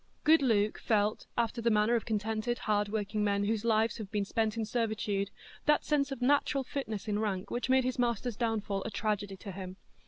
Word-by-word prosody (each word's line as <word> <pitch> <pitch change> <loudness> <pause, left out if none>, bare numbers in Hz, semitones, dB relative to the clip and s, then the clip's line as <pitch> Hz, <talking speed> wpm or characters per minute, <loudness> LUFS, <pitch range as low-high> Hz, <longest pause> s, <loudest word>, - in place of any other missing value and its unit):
Good 315 +1 +6
Luke 215 -5 +2
felt, 210 -1 +1
after 235 0 0
the 235 - +2
manner 215 +1 +3
of 235 - 0
contented 220 +2 -1
hard 210 -1 0
working 210 0 -1
men 200 -1 +1
whose 215 +1 0
lives 225 0 +2
have 210 -3 -6
been 205 0 -1
spent 220 +1 0
in 225 - 0
servitude, 215 -3 -1 0.4
that 300 - +4
sense 290 -2 +1
of 260 -2 -4
natural 280 0 +3
fitness 220 -7 -4
in 210 -1 0
rank 200 -4 -2
which 245 +1 -2
made 260 0 +5
his 255 0 -2
master's 240 -1 0
downfall 215 -4 -1
a - - -3
tragedy 205 -2 -2
to 195 +1 -8
him. 185 0 -7
220 Hz, 205 wpm, -31 LUFS, 205-240 Hz, 0.4 s, Good